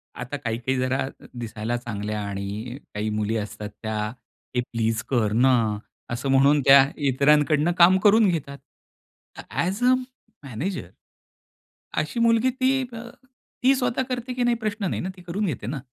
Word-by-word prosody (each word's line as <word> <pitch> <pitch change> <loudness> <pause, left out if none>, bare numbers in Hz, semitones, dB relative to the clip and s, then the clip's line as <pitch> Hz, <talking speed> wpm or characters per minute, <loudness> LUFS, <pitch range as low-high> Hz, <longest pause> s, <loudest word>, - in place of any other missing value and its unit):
आता 125 +4 -5
काही-काही 125 0 -2
जरा 130 +1 0 0.3
दिसायला 115 0 -3
चांगल्या 105 -3 -4
आणि 100 +5 -5 0.2
काही 105 +1 -2
मुली 105 +1 -1
असतात 105 0 -5
त्या. 110 0 -2 0.6
"हे 125 - +2
प्लीज 115 -2 0
कर 115 -6 +1
ना." 130 +4 +4 0.6
असं 125 +3 -3
म्हणून 140 +2 +5
त्या 135 0 +8 0.2
इतरांकडनं 150 +4 +3
काम 180 +2 +7
करून 210 +2 +5
घेतात. 140 -5 -3 0.9
ॲज 190 +7 -1
अ 250 +1 +6 0.5
मॅनेजर 140 - -4 1.1
अशी 155 +10 -4
मुलगी 230 +2 +4
ती 265 +1 +1
अ, - - -6 0.7
ती 265 +2 +6
स्वतः 250 -1 0
करते 250 0 -3
की 250 0 -1
नाही 240 0 +3
प्रश्न 215 -1 -2
नाही - - -2
ना, 185 - -3
ती - - -12
करून 180 +4 -3
घेते 125 - -3
ना. 135 +3 -3
135 Hz, 150 wpm, -24 LUFS, -, 1.1 s, त्या